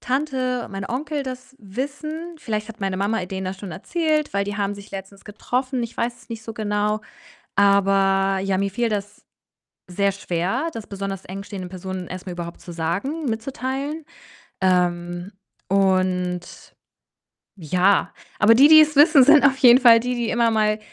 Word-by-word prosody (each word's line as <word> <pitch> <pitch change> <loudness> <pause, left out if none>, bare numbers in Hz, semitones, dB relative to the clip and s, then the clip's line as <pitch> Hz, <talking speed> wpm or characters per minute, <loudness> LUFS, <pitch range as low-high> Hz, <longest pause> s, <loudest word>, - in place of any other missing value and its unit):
Tante, 255 -2 -2
mein 195 0 -5
Onkel 290 +4 -3
das 260 0 -8
wissen, 290 - -6
vielleicht 215 -7 -4
hat 225 0 -10
meine 195 -1 -2
Mama, 205 +2 0
äh, - - -5
denen 190 0 -5
das 185 0 -5
schon 190 -3 -7
erzählt, 310 - -1
weil 200 0 +1
die 205 0 -4
haben 205 0 -1
sich 200 0 -13
letztens 195 0 -9
getroffen, 250 +4 -3
ich 235 0 -6
weiß 240 +1 -3
es - - -32
nicht 225 -2 -7
so 225 0 -7
genau. 210 0 -1 0.6
Aber, 195 -1 +3
ja, 195 -1 0
mir 200 0 0
fiel 235 +4 -1
das 205 -1 -5 0.6
sehr 200 +2 0
schwer, 190 - -2
das 225 -5 -7
besonders 195 -1 -5
eng 195 +2 -6
stehenden 200 -3 -7
Personen 185 0 -6
erst 185 0 -7
mal 180 - -5
überhaupt 170 -1 -7
zu 175 - -9
sagen 195 - -3
mitzuteilen. 270 +6 -4 0.6
Ähm, 175 0 0 0.4
und, 185 -2 0 0.8
ja, 185 +3 +1 0.3
aber 220 +2 +6
die 275 +5 +7
die's 310 -1 +7
wissen, 290 -1 +7
sind 290 +1 +6
auf 270 -1 +4
jeden 250 0 +7
Fall 230 -2 +7
die 250 +2 -2
die 240 -2 -2
immer 235 -1 +2
mal 215 -1 +1
205 Hz, 170 wpm, -22 LUFS, 190-255 Hz, 0.8 s, die